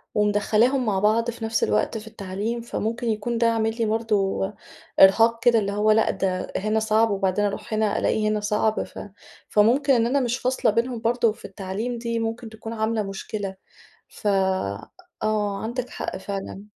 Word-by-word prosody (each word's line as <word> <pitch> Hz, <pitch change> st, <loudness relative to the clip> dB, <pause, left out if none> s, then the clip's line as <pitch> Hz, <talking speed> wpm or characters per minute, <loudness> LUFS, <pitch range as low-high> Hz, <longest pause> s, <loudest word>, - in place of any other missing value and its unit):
ومدخّلاهم 210 Hz, +5 st, +2 dB
مع 200 Hz, -3 st, +1 dB
بعض 225 Hz, +3 st, +2 dB
في 230 Hz, -1 st, -6 dB
نفس 225 Hz, 0 st, 0 dB
الوقت 105 Hz, -, +1 dB
في 220 Hz, 0 st, -9 dB
التعليم، 215 Hz, +2 st, -4 dB
فممكن 235 Hz, +1 st, -3 dB
يكون 225 Hz, +2 st, -1 dB
ده 235 Hz, -, +3 dB
عامل 225 Hz, 0 st, 0 dB
لي 230 Hz, -, +1 dB
برضو 215 Hz, -3 st, 0 dB, 0.6 s
إرهاق 225 Hz, +4 st, +6 dB
كده، 235 Hz, -2 st, +5 dB
اللي 200 Hz, -1 st, -2 dB
هو 210 Hz, +1 st, +2 dB
لأ 220 Hz, +1 st, +3 dB
ده 185 Hz, -1 st, -2 dB
هنا 215 Hz, +2 st, 0 dB
صعب 220 Hz, 0 st, +2 dB
وبعدين 195 Hz, +1 st, +1 dB
أروح 205 Hz, +2 st, -4 dB
هنا 215 Hz, -1 st, +1 dB
ألاقي 215 Hz, 0 st, +1 dB
هنا 215 Hz, 0 st, 0 dB
صعب 210 Hz, +1 st, 0 dB
ف -, -, -10 dB, 0.5 s
فممكن 255 Hz, +7 st, +4 dB
إن 230 Hz, -2 st, +3 dB
أنا 275 Hz, +4 st, +2 dB
مش 245 Hz, -1 st, 0 dB
فاصلة 255 Hz, -3 st, +1 dB
بينهم 235 Hz, +2 st, -1 dB
برضو 230 Hz, -1 st, +2 dB
في -, -, -14 dB
التعليم 200 Hz, +5 st, -4 dB
دي 230 Hz, 0 st, -2 dB
ممكن 225 Hz, +1 st, -3 dB
تكون 220 Hz, +1 st, -8 dB
عاملة 220 Hz, 0 st, 0 dB
مشكلة، 195 Hz, 0 st, -5 dB, 0.5 s
ف -, -, -7 dB, 1.0 s
آه 210 Hz, -2 st, 0 dB
عندِك 245 Hz, +3 st, -3 dB
حق -, -, -5 dB
فعلًا. 195 Hz, 0 st, -6 dB
220 Hz, 170 wpm, -24 LUFS, 205-230 Hz, 1.0 s, إرهاق